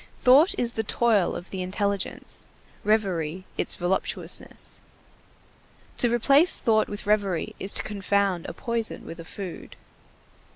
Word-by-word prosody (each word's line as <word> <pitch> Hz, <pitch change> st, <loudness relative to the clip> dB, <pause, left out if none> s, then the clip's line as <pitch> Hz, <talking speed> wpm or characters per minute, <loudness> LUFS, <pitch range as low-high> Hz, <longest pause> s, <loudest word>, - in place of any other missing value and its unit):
Thought 275 Hz, +8 st, +6 dB
is 235 Hz, -1 st, +1 dB
the 220 Hz, -, -1 dB
toil 215 Hz, -4 st, +2 dB
of 175 Hz, -, -8 dB
the 190 Hz, -, -4 dB
intelligence, 200 Hz, +1 st, -1 dB, 0.4 s
reverie 185 Hz, -5 st, 0 dB
its -, -, 0 dB
voluptuousness. 185 Hz, 0 st, -2 dB, 1.2 s
To 240 Hz, -, +3 dB
replace 275 Hz, +8 st, +5 dB
thought 220 Hz, -2 st, +2 dB
with 205 Hz, +1 st, -6 dB
reverie 200 Hz, -5 st, 0 dB
is 195 Hz, -, 0 dB
to -, -, 0 dB
confound 200 Hz, -3 st, 0 dB
a -, -, -6 dB
poison 235 Hz, -2 st, -2 dB
with 165 Hz, -, -9 dB
a 165 Hz, -, -8 dB
food. 190 Hz, 0 st, -8 dB
205 Hz, 130 wpm, -25 LUFS, 185-230 Hz, 1.2 s, Thought